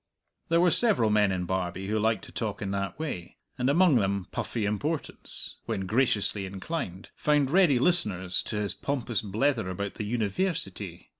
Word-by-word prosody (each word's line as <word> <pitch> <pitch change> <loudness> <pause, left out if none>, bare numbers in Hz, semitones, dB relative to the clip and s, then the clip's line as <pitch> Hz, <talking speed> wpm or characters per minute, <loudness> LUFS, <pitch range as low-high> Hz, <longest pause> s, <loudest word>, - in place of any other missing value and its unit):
There 165 0 +4
were 175 0 +4
several 195 - +5
men 105 -2 +4
in 90 -1 -2
Barbie 95 0 -2
who 110 +2 0
liked 110 -1 +1
to - - -13
talk - - -3
in 100 - -3
that 100 0 -3
way, 140 - -5 0.2
and 125 +2 +2
among 165 -1 +5
them 100 -3 0
Puffy 110 -3 -2
Importance, 145 +10 -3
when 95 - -2
graciously 105 -3 +1
inclined, 95 - -5
found 145 -2 +2
ready 175 -7 +5
listeners 105 - +1
to - - -4
his 105 -2 -1
pompous 125 -7 -2
blether 110 +1 0
about 100 +2 -4
the 105 0 -5
"Univairsity." 110 - -2
105 Hz, 165 wpm, -28 LUFS, 95-145 Hz, 0.2 s, several